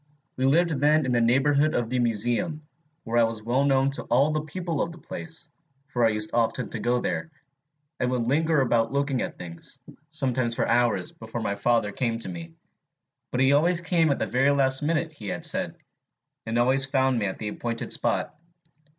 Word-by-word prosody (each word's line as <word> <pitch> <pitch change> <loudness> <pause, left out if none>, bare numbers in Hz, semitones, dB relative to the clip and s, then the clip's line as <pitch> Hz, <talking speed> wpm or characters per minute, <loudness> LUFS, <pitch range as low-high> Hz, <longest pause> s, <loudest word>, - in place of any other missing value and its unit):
We 130 +1 +1
lived 165 +5 +3
then 150 +1 +3
in 130 - -1
the 120 -1 +2
neighborhood 140 +5 +3
of 120 -2 -1
the 125 - +1
Museum, 120 - -1 0.4
where 115 +1 -1
I - - +6
was 115 -1 -2
well 125 +4 +1
known 135 -1 +3
to 140 - -6
all 135 +6 +3
the 155 0 0
people 165 +1 -3
of 170 - -1
the 170 - -12
place, 175 -1 -8 0.4
for 120 -4 0
I 115 - +5
used 105 0 -2
often 115 -1 0
to 115 - -4
go 120 +2 +1
there, - - -2 0.7
and 125 - +1
would 125 -2 -1
linger 155 +2 +2
about 115 -3 +1
looking 140 -2 0
at - - -4
things, 85 -1 -10 0.3
sometimes 130 -5 -1
for - - 0
hours 120 -6 +1
before 115 +1 -7
my 100 - -1
father 105 +1 +1
came 115 +1 -1
to 115 - -7
me 85 -2 -8 0.7
but 125 - -1
he 135 +1 +5
always 170 +4 +3
came 170 -2 +2
at 140 - +1
the - - -1
very 135 +3 +2 0.3
minute 160 +2 0
he 115 -9 -10
had - - -2
said, - - 0 0.7
and 115 +1 -1
always 130 +3 +3
found 130 -2 +2
me 105 - 0
at 95 - -4
the 105 - -4
appointed 115 +2 -3
spot. - - -1
130 Hz, 200 wpm, -26 LUFS, 115-150 Hz, 0.7 s, I